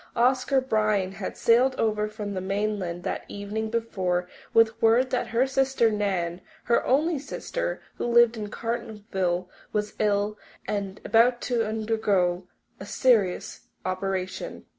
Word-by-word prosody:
Oscar 255 +2 +3
Bryan 215 -6 +1
had 195 0 -6
sailed 250 +3 +4
over 215 -2 0
from 210 -1 -5
the 185 - -3
mainland 195 -3 -2
the - - -2
evening 210 +2 -4
before 190 -6 -1 0.2
with 225 0 +3
word 235 +3 +4
that 250 - 0
her 235 +3 +2
sister 265 -3 +2
Nan 185 -4 -1 0.2
her 235 - +2
only 300 +4 +2
sister, - - -4
who - - -2
lived 235 0 +5
in 210 -2 -5
Cartonville 205 -6 -2 0.2
was 210 0 -2
ill 205 0 +1 0.3
and 200 -1 -3
about 240 +2 +4
to 235 -3 0
undergo 205 -5 0 0.3
a 195 - -7
serious 210 -9 +1 0.2
operation. 185 - -3
215 Hz, 135 wpm, -26 LUFS, 195-235 Hz, 0.3 s, lived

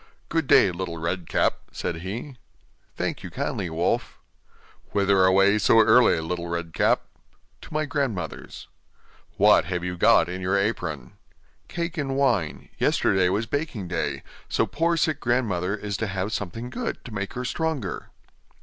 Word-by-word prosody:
'Good 160 -3 0
day, 95 - +6
Little 85 -1 -5
Red 85 +1 -3
Cap,' - - +1
said 85 - -3
he. 105 - -6 0.6
'Thank - - -3
you - - -7
kindly, 90 - -3
wolf.' 80 +2 -1 0.8
'Whither 100 -2 +4
away 95 +3 +4
so 115 +3 +5
early, 115 -4 +5
Little 85 +1 -4
Red 85 -1 -4
Cap?' - - +2 0.6
'To - - -13
my 155 0 0
grandmother's.' 130 - -4 0.7
'What - - +5
have 90 -1 -3
you 90 0 -3
got 85 - +5
in 90 +1 -5
your 95 +2 +1
apron?' 90 - -2 0.5
'Cake 170 0 -4
and 135 -2 -2
wine; 120 - 0
yesterday 95 -2 +2
was 105 +5 0
baking 120 - -3
day, 90 - -2 0.3
so - - +2
poor 170 +2 0
sick 155 -2 +1
grandmother 105 - 0
is 100 -1 -4
to 110 - -2
have 95 +2 -3
something 115 +5 -4
good, 245 -1 -4
to 120 - -9
make 100 -1 -4
her 125 +1 -4
stronger. 160 +1 -3
100 Hz, 155 wpm, -25 LUFS, 90-130 Hz, 0.8 s, day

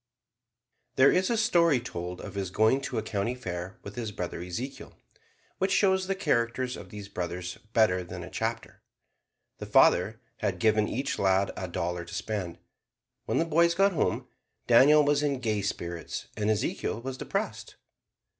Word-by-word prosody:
There 135 +1 +6
is 185 +1 +2
a 235 - +1
story 170 - +4
told 90 -7 -6
of - - -8
his 100 -2 -3
going 110 +7 +3
to 130 -3 -4
a 110 - -1
county 110 +2 -2
fair 95 -4 -6
with - - -8
his 115 -3 -4
brother 90 -3 -5
Ezekiel, 115 +10 -6 0.6
which 190 +1 +1
shows 190 -2 +3
the 195 - 0
characters 125 -7 0
of - - -10
these 105 -2 -8
brothers 90 -1 -5
better 90 -5 +3
than 85 - -7
a - - -8
chapter. - - -4 0.8
The - - -6
father - - +4 0.2
had - - -1
given 110 -1 +3
each 140 +4 -2
lad 95 0 +2
a 95 - -4
dollar 85 0 -3
to 85 - -8
spend. 95 -6 -3 0.7
When - - 0
the 165 - +2
boys 170 +1 +3
got 195 +2 +4
home 170 - -1 0.4
Daniel 145 +5 +6
was 145 0 +3
in 140 -3 0
gay 110 -4 0
spirits 85 -3 -4
and 105 -1 -1
Ezekiel 115 - -1
was 130 +2 -5
depressed. - - -4
115 Hz, 165 wpm, -28 LUFS, 95-145 Hz, 0.8 s, There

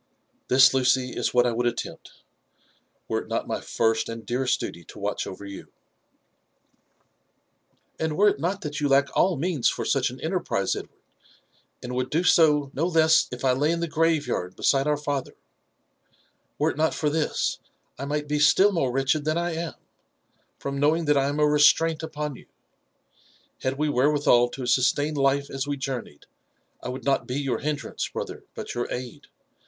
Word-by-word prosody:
This, 135 +2 +6
Lucy, 130 -1 +2
is - - -1
what 125 0 +3
I 120 - +2
would 120 +1 0
attempt^ 120 - -5 1.0
were - - 0
it - - -9
net - - -2
my - - -3
first 110 0 0
and 115 -1 -7
dearest 125 +3 0
duty 85 - -6
to - - -13
watch 105 0 -3
over 100 +2 -8
you." 100 -1 -10 1.1
'' - - -44
And 160 -1 -2
were 205 +2 +5
it 170 - -3
not 185 +6 -2
that 150 -1 -4
you 145 - +2
lack 140 +1 +2
all 180 -3 +3
means 155 -4 +1
for - - -4
such - - +1
an - - -10
enterprise, - - -1
Edward, - - -7 0.9
and 125 0 -5
would 130 +1 -2
do 165 +6 +1
so 150 -5 +4
no 165 +5 0
less 160 -2 +4
if 125 +2 -5
I 130 - +4
lay 140 +4 +1
in 170 - -1
the 170 - -1
grave 160 -1 +1
yard 90 +1 -3
beside 135 +1 +2
our 150 -1 +2
father 145 -2 -3 1.2
,^^were - - +2
it - - -11
not 160 +1 +1
for 150 -1 0
this, 155 0 -1 0.4
I 140 - -4
might 150 +1 -2
be 150 0 0
still 190 +7 +5
more 150 -9 0
wretched 135 +3 +1
than 155 +2 0
I 170 0 -1
am, 165 0 -4 0.8
from 140 0 -4
knowing 160 +3 +2
that 150 0 +3
I 135 0 +2
am 145 +1 -3
a 150 - +4
restraint 155 +2 +4
upon 150 -3 -4
you* - - -15 1.1
Had 130 +1 -2
we 150 +1 0
wherewithal 140 -3 +3
to 130 +1 -6
sustain 140 +4 +2
life 140 0 +1
as 135 +1 -3
we 145 -1 -2
journeyed, 130 - -6 0.6
I - - -5
would 130 +1 -6
not 140 -1 0
be 130 +2 -2
your 135 -3 -1
hindrance, 145 -4 -3
hn^ - - -3
ther, - - -11
but - - -6
your 120 - -3
aid. 125 -1 -6
140 Hz, 190 wpm, -25 LUFS, 130-155 Hz, 1.2 s, This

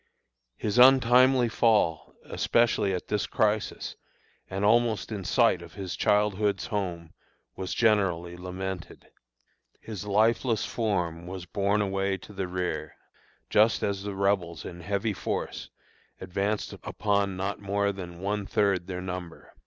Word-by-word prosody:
His 105 +2 0
untimely 130 0 +6
fall, 110 -8 +1
especially 115 -4 +2
at 90 -2 -3
this 105 -1 -1
crisis 105 0 -1 0.5
and 95 +2 -1
almost 115 0 +2
in 100 -3 -4
sight 115 -1 +3
of 85 -2 -12
his 95 -3 -5
childhood's 105 -1 +1
home, 90 -7 -4 0.4
was 95 -1 -4
generally 95 -6 +2
lamented. 90 0 -6 0.7
His 105 -4 -7
lifeless 110 +3 +2
form 90 -7 -2
was 90 -1 -6
borne 100 +2 +1
away 95 0 -1
to 105 - -13
the 95 -2 -3
rear 90 -5 -3 0.6
just 110 +2 +4
as 100 -1 -1
the 100 0 -5
Rebels 95 -4 0
in 85 - -8
heavy 100 +4 -1
force - - -4 0.5
advanced 100 +3 -2
upon 100 -2 -1
not 95 +2 -3
more 100 0 0
than 90 -3 -8
one 100 0 -2
third 100 -4 +1
their 90 -1 -4
number. 90 -2 -7
100 Hz, 130 wpm, -27 LUFS, 90-105 Hz, 0.7 s, untimely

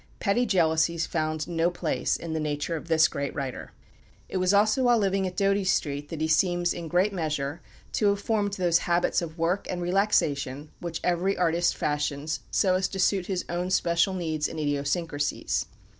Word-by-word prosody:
Petty 235 +4 +1
jealousies 165 -3 +2
found 155 -1 -2
no 170 0 +1
place 175 - -1
in 165 -1 -6
the 160 - -1
nature 150 +2 -2
of 160 - -7
this 160 -1 +5
great 140 -1 -4
writer. 135 -3 -5 0.6
It - - -2
was 185 0 +2
also 215 +5 +3
while 245 -2 +4
living 195 -2 +1
at 180 -1 -7
Doughty 200 0 +2
Street 145 -5 -1
that 160 -2 -5
he 160 - +1
seems, 175 +2 +2
in 170 -1 -6
great 180 +5 +2
measure, 150 -3 -2 0.3
to 210 - +1
have 200 0 +2
formed 205 -1 0
those 175 -4 +2
habits 175 +1 +2
of 165 -1 -6
work 170 +4 0
and 180 - -2
relaxation 155 -7 0
which 170 -2 -5
every 180 +2 +1
artist 175 0 +1
fashions 145 +1 -1
so 190 -3 +2
as 185 0 +1
to 195 - -7
suit 185 0 +2
his 185 -2 -2
own 175 +1 -2
special 175 0 +2
needs 160 -4 -1
and 160 - -6
idiosyncrasies. 145 +1 -1
170 Hz, 185 wpm, -27 LUFS, 155-190 Hz, 0.6 s, this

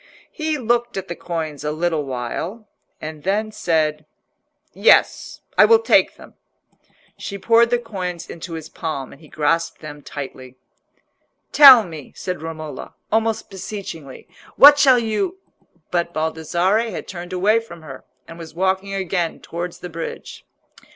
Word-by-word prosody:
He 310 -1 -2
looked 240 -2 0
at 190 -1 -5
the 170 - -4
coins 160 -5 -5
a 150 - -1
little 160 -1 -1
while, 150 - -5 0.3
and 155 -1 -7
then 210 +5 -1
said— 155 -7 -1 0.7
"Yes, - - +3 0.2
I - - +9
will 455 - +6
take 455 - +3
them." - - -15 0.9
She 200 - -6
poured 230 +3 +4
the 245 - +2
coins 185 -7 -6
into 170 +1 -8
his 160 -1 -6
palm, 155 -5 -5
and 140 - -15
he 155 - -15
grasped 165 +2 -1
them 150 -1 -10
tightly. 130 -3 -8 1.0
"Tell 270 -6 +10
me," 160 -7 -10
said 180 -3 -5
Romola, 160 -1 -7 0.2
almost 220 0 0
beseechingly. 185 -7 -8 0.3
"What 290 +1 +9
shall 265 -3 +6
you—" 235 - -1 0.5
But 170 -1 -1
Baldassarre 170 +8 0
had 185 - -7
turned 175 -1 -8
away 200 +5 +2
from 170 -8 -12
her, 135 -4 -10 0.2
and 165 +1 -11
was 160 -1 -10
walking 190 +2 -1
again 180 -3 -2
towards 170 +1 -6
the 180 - -7
bridge. 165 0 -8
175 Hz, 145 wpm, -21 LUFS, 160-215 Hz, 1.0 s, Tell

